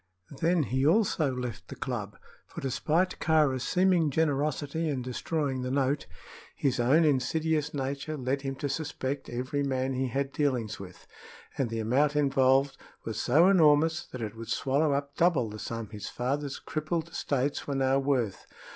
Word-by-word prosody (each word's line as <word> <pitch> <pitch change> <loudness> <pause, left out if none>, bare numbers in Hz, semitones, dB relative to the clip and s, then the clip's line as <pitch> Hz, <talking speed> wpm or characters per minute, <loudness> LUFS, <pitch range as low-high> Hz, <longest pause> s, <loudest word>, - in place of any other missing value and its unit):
Then 170 0 +2
he 130 0 -1
also 160 -3 +3
left 125 -2 -5
the - - -8
club, - - -4 0.3
for, - - -8
despite 155 +8 0
Kāra's 150 -5 +2
seeming 180 +1 +3
generosity 150 +1 0
in 135 -4 -2
destroying 135 +1 -2
the 125 - -3
note, 140 +1 0 0.5
his 130 -2 0
own 140 +7 +4
insidious 150 +2 +1
nature 140 +2 -3
led 135 +1 -1
him 135 -1 -3
to 140 +2 -3
suspect 140 -1 -3
every 130 +4 -2
man 135 -1 -1
he 130 +1 -1
had 135 +3 -2
dealings 125 -7 -1
with, 90 -2 -11 0.5
and 130 -4 -1
the 115 - -3
amount 135 +7 +2
involved 135 -1 +3 0.3
was 110 - -3
so 155 +8 +5
enormous 160 -2 +4
that 125 -2 -6
it 105 0 -5
would 115 0 -8
swallow 140 +3 +1
up 140 0 -3
double 145 -11 +2
the 105 - -8
sum 115 -2 -5
his 105 -2 -6
father's 135 +3 -2
crippled 160 +1 -3
estates 140 -3 -2
were 140 - -2
now 135 0 +2
worth. 130 -7 -1
140 Hz, 165 wpm, -29 LUFS, 130-155 Hz, 0.5 s, so